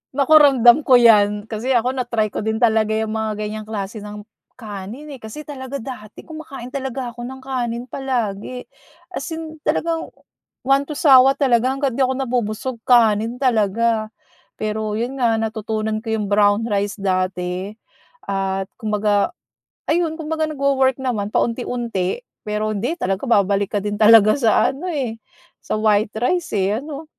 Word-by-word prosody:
Naku, 280 +2 +2
ramdam 255 -5 +6
ko 260 - +4
'yan 210 -3 +4
kasi 235 +4 -1
ako 245 +2 +2
na-try 235 -4 -1
ko - - -5
din 220 +1 -1
talaga 220 -2 +3
yang 220 0 -1
mga 220 -1 -2
ganyang 215 0 -5
klase 210 0 -5
ng 210 0 -8 0.3
kanin, 220 +6 -8
eh, 270 - -9
kasi 220 +7 -8
talaga 275 -2 -7
dati 215 -5 -9
kumakain 280 -6 -9
talaga 265 -2 -4
ako 240 0 -8
ng 265 +1 -9
kanin 240 -3 -3
palagi 250 -2 -3 0.5
as - - -5
in 315 -1 -8
talagang 330 0 0 0.6
one 275 +2 +2
to 300 - -5
sawa 270 -2 +6
talaga 250 -4 +2
hangga't 275 -1 0
'di - - +1
ako 260 - -1
nabubusog, 250 -1 -2
kanin 225 -1 +4
talaga. 225 -2 +1 0.5
Pero 215 0 -3
'yon 245 +5 -3
nga 230 -3 +2
natutunan 220 0 -2
ko 225 0 -4
'yong 210 -2 -3
brown 205 +1 +3
rice 205 0 -1
dati 185 0 -2 0.6
at 195 0 -2
kumbaga 210 - 0 0.6
ayun 325 -1 +1
kumbaga 315 0 -2
nagwo-work 275 -3 +1
naman 220 -6 -1
paunti-unti. 235 - -1 0.2
Pero 210 0 -2
hindi 240 - -2
talaga 195 - -2
babalik 200 -2 +2
ka - - +1
din 205 0 -3
talaga 215 -1 +7
sa 225 -5 +3
ano, 335 +7 -7
eh, 255 -9 -3 0.4
sa - - -3
white 215 -1 +1
rice, 320 +5 -1
eh, 200 +3 +1
ano. 300 +1 -8
230 Hz, 155 wpm, -20 LUFS, 210-265 Hz, 0.6 s, talaga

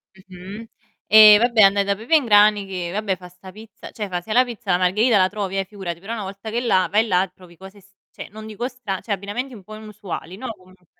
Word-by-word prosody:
Mh-mh, 190 +3 -11 0.4
e 215 -1 +9
vabbè 235 -1 +3
andai 200 0 +5
da 200 0 -1
Pepe 230 +10 0
in 295 -5 +3
Grani 210 -1 +4
che, 180 -3 -5
vabbè, 200 0 -2
fa 180 -1 -13
'sta 180 +2 -14
pizza 215 +2 -13
cioè 210 -3 -6
fa 180 -1 -3
se 215 - -6
la 250 +2 +5
pizza 235 -7 -2
margherita 210 +6 +2
la 185 -1 +3
trovi, 195 -2 -4
eh, 195 - -1
figurati, 185 -4 -7
però 205 +6 -7
una 220 - -5
volta 195 +3 -8
che 225 - -4
è 240 - 0
là, 190 -6 +2
vai 215 +3 +3
là 185 -1 +1
trovi 180 -2 -18
cose 190 +3 -14
s 195 +1 -26 0.2
cioè - - -10
non 215 +1 -11
dico 220 +3 -5
stra 225 -8 -6
cioè 220 - -9
abbinamenti 205 +7 -4
un 205 - -12
po' 215 +3 -11
inusuali, 200 -5 -8
no 255 - -7
comunque 185 0 -22
200 Hz, 245 wpm, -21 LUFS, 185-220 Hz, 0.4 s, e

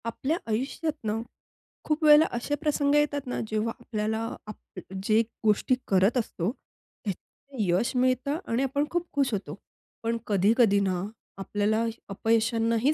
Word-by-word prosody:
आपल्या 270 +7 -1
आयुष्यात 270 +8 -1
ना 215 +1 -1 0.6
खूप 310 +1 0
वेळेला 300 +1 +8
असे 290 +5 -1
प्रसंग 290 -2 +2
येतात 290 -2 +1
ना 250 - -2
जेव्हा 220 +1 -1
आपल्याला 220 -2 -2 0.3
आपण 190 -2 -9
जे 215 +2 +4 0.2
गोष्टी 215 +4 +3
करत 195 +5 +3
असतो 195 -6 -1 0.6
त्यात 200 -3 -1 0.4
यश 195 +5 +1
मिळतं 255 +3 +1
आणि 235 +3 +1
आपण 280 +2 0
खूप 350 0 0
खुश 275 -2 +1
होतो. 205 -1 -3 0.5
पण 230 +1 0
कधी-कधी 205 +1 +4
ना 185 -2 0 0.3
आपल्याला 210 +3 0 0.3
अपयशांनाही 225 +5 +2
230 Hz, 135 wpm, -27 LUFS, 210-275 Hz, 0.6 s, वेळेला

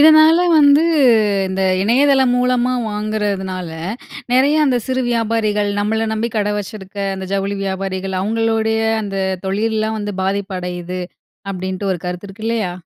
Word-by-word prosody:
இதனால 315 +2 +7 0.2
வந்து 285 +1 +6 0.7
இந்த 190 0 -2 0.2
இணையதளம் 265 +3 +3
மூலமா 250 0 +1 0.2
வாங்குறதுனால, 200 -4 -3 0.6
நெறைய 285 +5 +4
அந்த 255 - +2
சிறு 260 0 -1
வியாபாரிகள், 220 -3 0
நம்மள 220 +2 0
நம்பி 225 +2 -1
கடை 210 0 0
வச்சிருக்க 200 -1 -8 0.2
அந்த 190 0 -6
ஜவுளி 200 0 -1
வியாபாரிகள், 190 0 -3
அவங்களுடைய 220 +1 0 0.2
அந்த 195 -1 -4 0.3
தொழில்லாம் 220 +2 -1
வந்து 205 -1 -4
பாதிப்பு 195 0 -2
அடையுது. 180 0 -5 0.5
அப்படின்டு 185 +1 -4
ஒரு 175 - -3
கருத்து 180 +2 -5
இருக்கு 205 +3 -10
இல்லையா? 220 -6 -1
210 Hz, 130 wpm, -18 LUFS, 190-230 Hz, 0.7 s, இதனால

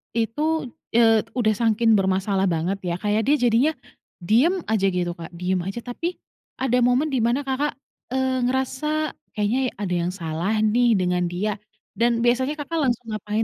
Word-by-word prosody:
itu 295 +6 0 0.3
eee, 225 -2 +5
udah 215 -2 +3
sangking 225 0 +2
bermasalah 190 0 +1
banget 175 +3 -1
ya 170 - -1
kayak 210 +1 +2
dia 290 - +5
jadinya, 240 +7 +3 0.5
diem 245 - +3 0.2
aja 205 -3 +2
gitu 175 -1 0
Kak, 165 +1 -8
diem 180 +2 -1
aja. 195 +5 -4
Tapi, 250 +7 -4 0.5
ada 250 -1 +2
momen 250 +5 +3
dimana 240 +1 +2
Kakak, 280 +2 0 0.4
eee, 260 -1 0
ngerasa 265 +4 -1 0.2
kayaknya 215 +4 0 0.2
ada 180 -3 -1
yang 175 +1 -1
salah 170 +3 -2
nih 240 +3 +3
dengan 180 0 +1
dia 205 +4 -1 0.5
dan 235 +1 +3
biasanya 260 +4 +2
Kakak, 330 +3 -3
langsung 240 0 -2
ngapain 215 +1 -2
225 Hz, 155 wpm, -23 LUFS, 195-260 Hz, 0.5 s, eee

